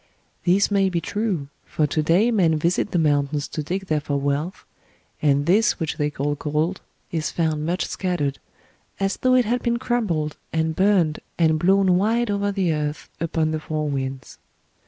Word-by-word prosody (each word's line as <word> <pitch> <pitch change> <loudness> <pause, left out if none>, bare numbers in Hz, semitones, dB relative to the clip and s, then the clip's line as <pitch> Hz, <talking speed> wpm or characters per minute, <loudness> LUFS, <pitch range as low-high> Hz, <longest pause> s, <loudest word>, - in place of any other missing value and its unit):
This 190 +4 +3
may 195 -1 +3
be 175 -2 0
true, 190 -7 -2
for 155 - 0
to 150 +2 0
day 180 +10 +3
men 175 -8 +3
visit 170 +4 +1
the - - -1
mountains 145 -2 +1
to 155 - -3
dig 185 +6 -3
there 155 -4 +1
for 145 -1 -1
wealth, 145 +6 -2 0.6
and 145 -1 +2
this 200 +7 +3
which 160 -3 -2
they 150 0 +1
call 145 0 -2
gold 155 +5 -1 0.3
is 160 -2 -1
found 155 -2 -1
much 180 +2 0
scattered, 165 -7 -2 0.6
as 195 0 0
though 255 0 +3
it 250 -1 +4
had 245 +3 0
been 235 0 0
crumbled 210 -12 -1
and 160 0 0
burned 185 -5 +2 0.2
and 160 -2 +3
blown 190 +1 +4
wide 225 +2 +1
over 200 0 0
the 190 -5 +1
earth 150 0 -4
upon 160 -1 0
the 155 - -1
four 155 0 -3
winds. 135 -1 -4
165 Hz, 180 wpm, -23 LUFS, 150-195 Hz, 0.6 s, it